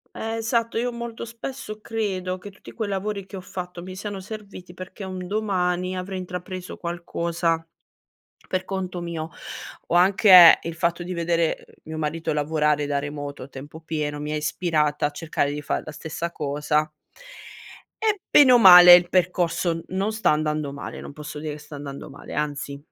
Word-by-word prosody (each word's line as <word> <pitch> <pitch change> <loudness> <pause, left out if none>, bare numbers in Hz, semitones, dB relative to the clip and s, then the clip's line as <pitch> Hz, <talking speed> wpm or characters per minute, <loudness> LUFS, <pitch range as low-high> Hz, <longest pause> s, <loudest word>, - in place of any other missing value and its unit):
Eh, 225 0 -3
esatto, 230 0 -1
io 245 +2 0
molto 235 -1 -6
spesso 230 -2 -7
credo 190 -5 -2
che 200 +2 -10
tutti 200 - -14
quei 220 -3 -4
lavori 200 0 -3
che 195 - -11
ho 185 - -6
fatto 180 -1 -7
mi 185 +1 -8
siano 205 0 -5
serviti 195 -3 -10
perché 185 +2 -9
un 185 -1 -5
domani 185 -3 -1
avrei 185 +1 -4
intrapreso 185 0 -6
qualcosa 170 -1 -2 0.8
per 185 0 -1
conto 185 -2 -4
mio 165 -2 -5 0.6
o - - 0
anche 185 -1 +8
il 165 0 -5
fatto 170 +1 -1
di 180 +1 -5
vedere, 170 -1 +1
ehm, - - -20
mio 160 0 -7
marito 155 +1 -2
lavorare 150 0 +1
da 145 -1 0
remoto 145 -1 -6
a 130 - -9
tempo 145 +3 -10
pieno 150 -2 -3
mi 150 +1 -4
ha - - 0
ispirata 150 -1 0
a 145 - 0
cercare 145 -2 -2
di 150 - -4
far 145 - -2
la 155 - -7
stessa 160 +3 -5
cosa 150 +1 -1 1.2
e 420 -2 +2
bene 280 -3 +7
o 245 - +8
male 180 -3 +11
il 175 0 +3
percorso 175 -2 +1
non 195 +3 -1
sta 220 -5 +2
andando 150 -2 -1
male, 140 - -7
non - - -9
posso 150 0 -8
dire 155 0 -4
che 150 - -9
sta 150 0 -11
andando 140 0 -8
male 140 - -11
anzi, 145 -1 -3
175 Hz, 180 wpm, -24 LUFS, 150-190 Hz, 1.2 s, male